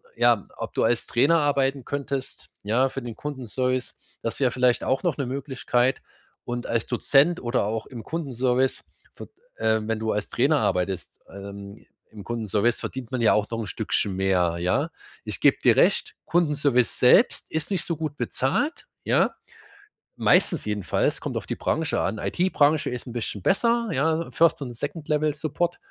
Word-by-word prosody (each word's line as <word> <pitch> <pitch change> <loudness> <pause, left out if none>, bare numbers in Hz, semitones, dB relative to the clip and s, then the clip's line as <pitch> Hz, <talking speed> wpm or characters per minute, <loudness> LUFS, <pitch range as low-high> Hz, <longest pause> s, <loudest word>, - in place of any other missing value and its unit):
ja, - - +3
ob - - -6
du - - +2
als - - +1
Trainer 165 0 +3
arbeiten 140 -2 +1
könntest, 140 -1 -4
ja, 120 +6 +2
für 135 - -6
den 120 -2 -6
Kundenservice. 130 -2 -3 0.3
Das 115 - -3
wäre 130 -3 +2
vielleicht 125 0 +2
auch 130 - 0
noch 175 -6 0
'ne 140 - -1
Möglichkeit. 130 -1 0 0.5
Und 120 0 -3
als 115 - 0
Dozent 145 +7 +3
oder 120 -3 0
auch 110 +1 -3
im 120 -4 -9
Kundenservice 130 -5 -1 0.3
v - - -9 0.3
äh, 110 0 +2
wenn 110 +1 -1
du 110 0 -1
als 105 - -2
Trainer - - +2
arbeitest, 90 +1 -2
ähm, 100 +1 -10 0.3
im 105 -2 -10
Kundenservice 115 0 0
verdient 130 -3 -6
man 130 - -1
ja 115 - +5
auch 105 0 +1
noch 115 - -3
'n 115 - -3
Stückchen 95 +2 -1
mehr, 90 -3 +1
ja? 90 +1 0 0.3
Ich - - -5
gebe - - +5
dir - - +5
recht, - - +3
Kundenservice 145 -7 +2
selbst 125 - +4
ist 160 +4 -2
nicht 190 -4 +1
so 170 - -2
gut 155 -2 -4
bezahlt, 135 - -1 0.2
ja. - - +2 0.8
Meistens 170 - +3
jedenfalls, 105 -3 -1
kommt - - -3
auf - - -4
die - - -2
Branche - - -1
an. - - -1
IT-Branche 155 -4 +2
ist 125 -1 -5
'n 120 - -7
bisschen 110 -4 -4
besser, 235 +2 +2
ja, 160 +4 0
First 165 -2 +3
und 125 -3 -6
Second-Level-Support. 155 +4 -2
130 Hz, 165 wpm, -25 LUFS, 110-150 Hz, 0.8 s, ja